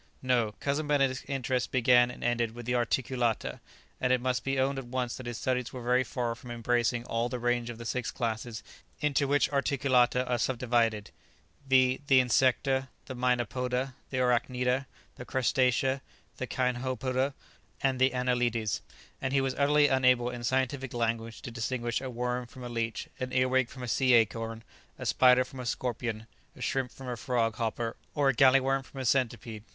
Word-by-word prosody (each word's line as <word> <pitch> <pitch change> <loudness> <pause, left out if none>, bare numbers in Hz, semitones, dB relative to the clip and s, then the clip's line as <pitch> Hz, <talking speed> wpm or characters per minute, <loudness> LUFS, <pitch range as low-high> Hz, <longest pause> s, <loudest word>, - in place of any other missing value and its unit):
No; 120 -4 +1
Cousin 145 +2 -1
Benedict's 135 -3 +1
interest 130 -2 -1
began 125 -1 +5
and 125 - -9
ended 120 -2 0
with 120 -1 -8
the 125 - -1
articulata; 120 -1 0 0.4
and 125 - +1
it 130 - +4
must 125 0 -1
be 135 0 0
owned 135 +1 +1
at 130 - -8
once 125 -1 -2
that 130 - -8
his 120 -1 -4
studies 125 -1 -1
were 125 -2 -7
very 125 +2 +3
far 120 -2 -2
from 125 +1 -12
embracing 120 0 0
all 115 +1 -1
the 125 - -3
range 120 0 0
of 120 - -6
the 115 - -8
six 125 +1 -2
classes 115 -1 -3 0.4
into 145 -1 +1
which 145 +1 +3
"articulata" 130 -3 +2
are 125 -1 0
subdivided; 115 -4 0 0.6
viz, 130 -1 +4
the 135 -2 +6
insecta, 130 +2 +2 0.2
the - - -6
mynapoda, 125 +1 0 0.2
the 130 - -3
arachnida, 125 +1 +1 0.3
the - - -7
crustacea, 130 +1 +1 0.4
the 130 - -4
cinhopoda, 130 +1 -1 0.5
and 135 -2 +1
the 130 +1 +5
anelides; 120 -4 0 0.4
and 130 0 -2
he 140 - +4
was 135 -1 0
utterly 145 +2 +4
unable 125 -2 +3
in 120 -1 -7
scientific 130 +1 -1
language 115 -1 -2
to 120 - -6
distinguish 120 +1 -2
a 130 - -4
worm 125 0 -2
from 125 +2 -11
a 120 - -5
leech, 115 -1 -3
an 130 0 -3
earwig 130 -1 +2
from 130 -1 -9
a - - -4
sea 125 +2 +4
acorn, 115 0 +1 0.3
a - - -7
spider 125 0 +5
from 130 +1 -11
a 125 - -5
scorpion, 115 -3 -3 0.3
a - - -13
shrimp 130 -2 -1
from 135 - -10
a 125 - -2
frog 115 -2 -1
hopper, 115 0 -2 0.2
or 145 -2 +3
a - - +3
galley 135 +1 +6
worm 135 +1 0
from 135 +1 -11
a 130 - -3
centipede. 115 -3 0
125 Hz, 180 wpm, -29 LUFS, 120-130 Hz, 0.6 s, the